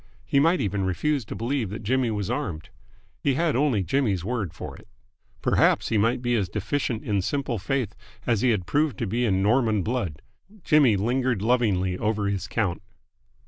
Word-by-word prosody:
He 140 - +2
might 165 +5 +3
even 100 -1 -1
refuse 130 - 0
to - - -6
believe 120 -2 -1
that 105 +3 -6
Jimmy 125 +2 +1
was 105 -4 -2
armed. 80 -3 -3 0.5
He 140 -2 +1
had 165 -1 +1
only 130 -7 +2
Jimmy's 95 - 0
word 110 -7 -2
for - - -8
it. - - -16 0.6
Perhaps - - +3
he 110 - +2
might 120 +4 +1
be 120 0 +1
as 100 -6 0
deficient 110 +4 -2
in 100 -3 0
simple 135 +1 -2
faith 125 +3 -1 0.3
as 115 -4 +1
he 130 - +3
had 105 -6 +1
proved 145 - +1
to 120 - -2
be 115 +4 0
in 95 -3 +1
Norman 110 -2 +2
blood! 105 - -3 0.4
Jimmy 140 -9 +4
lingered 120 +1 0
lovingly 100 -7 +1
over 105 -1 0
his 100 -3 -2
count. 95 -2 -1
110 Hz, 185 wpm, -25 LUFS, 100-130 Hz, 0.6 s, Jimmy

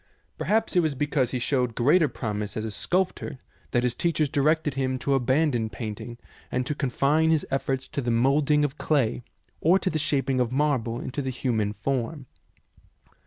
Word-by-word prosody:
Perhaps 220 -1 +1
it - - +6
was 155 -4 +1
be 150 - 0
cause 140 -4 +1
he 130 - -2
showed 125 -2 0
greater 150 +7 +4
promise 105 -5 -4
as 110 - -2
a 110 - -4
sculptor 175 - -1 0.3
that 120 - +1
his 125 -1 +1
teachers 155 +1 0
directed 150 +1 +1
him 130 -1 -1
to 140 +2 0
abandon 130 -2 +1
paint 110 -1 -6
ing 120 -1 -8 0.3
and 125 0 0
to 150 - -1
confine 145 +3 +1
his 160 -2 +2
efforts 135 -1 -1
to 140 - -3
the 120 - -2
moulding 140 +5 +3
of 145 +1 -5
clay, 135 -6 +1 0.4
or 175 +4 +4
to 190 -1 -1
the 155 - -1
shaping 135 -3 +1
of 125 -1 +1
marble 130 -5 0
into 135 +3 -4
the 130 - -3
human 115 -5 -1
form. 135 +5 -3
135 Hz, 185 wpm, -26 LUFS, 120-150 Hz, 0.4 s, it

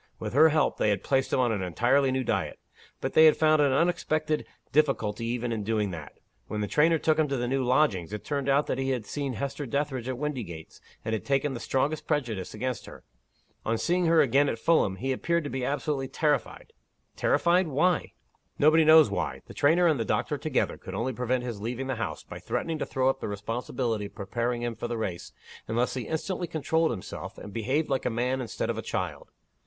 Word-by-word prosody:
With - - -5
her 155 +4 +7
help, 155 0 +1
they - - +2
had 100 - 0
placed 135 -1 +1
him - - +2
on 125 -2 +3
an 105 -3 -1
entirely 125 +9 +2
new 130 0 0
diet. - - -1 0.4
But - - -2
they 160 - +7
had 155 - +6
found 155 -1 +4
an 140 -2 +3
unexpected 155 0 0 0.2
difficulty 115 -7 +1
even 120 0 -2
in 110 -2 -2
doing 105 -2 0
that. 80 -4 -8 0.3
When 105 -1 -3
the 105 - -1
trainer 160 +6 +3
took 155 0 +1
him 155 - +3
to 140 -1 -1
the 120 0 -1
new 135 +1 0
lodgings, 120 - +2
it 105 - -6
turned 140 -2 -2
out 140 +2 +3
that 130 - -2
he 135 0 -1
had 125 -5 -1
seen 140 +2 -3
Hester 140 +5 -4
Dethridge 135 -1 -2
at 130 - -3
Windygates, 120 - -5 0.2
and 110 - -1
had 110 -4 -2
taken 140 0 0
the 120 - -5
strongest 140 +6 -1
prejudice 120 - -2
against 125 +1 -3
her. - - -12 0.6
On 115 +1 0
seeing 175 +6 +1
her 165 -1 +5
again 140 +1 +3
at - - -2
Fulham, 115 - +2
he 135 +7 -2
appeared 170 +5 0
to 145 - -5
be 130 -1 -3
absolutely 135 0 -1
terrified." 150 -1 -1 0.4
"Terrified? 175 +1 +2
Why?" 160 +4 +1 0.4
"Nobody 155 +2 +5
knows 155 -5 +7
why. 70 -9 -2
The - - -11
trainer 165 +5 +3
and 155 -6 +3
the - - +1
doctor - - -1
together - - -1
could - - -8
only 130 +3 -1
prevent 125 +1 -1
his 115 -5 -5
leaving 120 +4 -3
the 130 -2 -3
house, 75 - -4
by - - -9
threatening 165 -2 -3
to - - -2
throw 130 -1 0
up 135 - +1
the - - -4
responsibility 115 +2 -3
of 100 - -11
preparing 120 +4 -2
him 120 -1 -1
for 120 - -4
the 120 -1 -3
race, 95 -6 -4 0.4
unless 120 +3 0
he 130 -3 -4
instantly 175 +3 -2
controlled 160 +1 +1
himself, 105 -6 -6
and 105 - -9
behaved 130 +8 0
like 135 - -1
a - - +2
man 125 +3 -1
instead 115 -3 -2
of - - -4
a - - -2
child. - - -4
130 Hz, 220 wpm, -27 LUFS, 115-150 Hz, 0.6 s, her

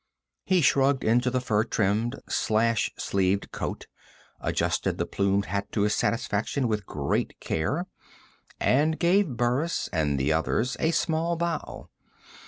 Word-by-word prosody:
He 185 -2 +4
shrugged 135 -1 +3
into 120 +3 +3
the 130 +1 0
fur 110 -4 +1
trimmed, 110 +2 0
slash 115 +1 +1
sleeved 100 0 0
coat, - - -4 0.5
adjusted - - -1
the - - -1
plumed 100 0 0
hat 100 +1 -3
to 105 - +1
his 105 +1 +2
satisfaction 115 +4 0
with 105 -3 -2
great - - -2
care, 140 - -1 0.7
and 155 +4 +2
gave 175 - +2
Burris 125 +8 0
and 75 -4 +1
the 70 +4 +2
others 110 +10 0
a 160 - +2
small 165 +1 0
bow. 170 -2 -3
120 Hz, 135 wpm, -26 LUFS, 100-150 Hz, 0.7 s, He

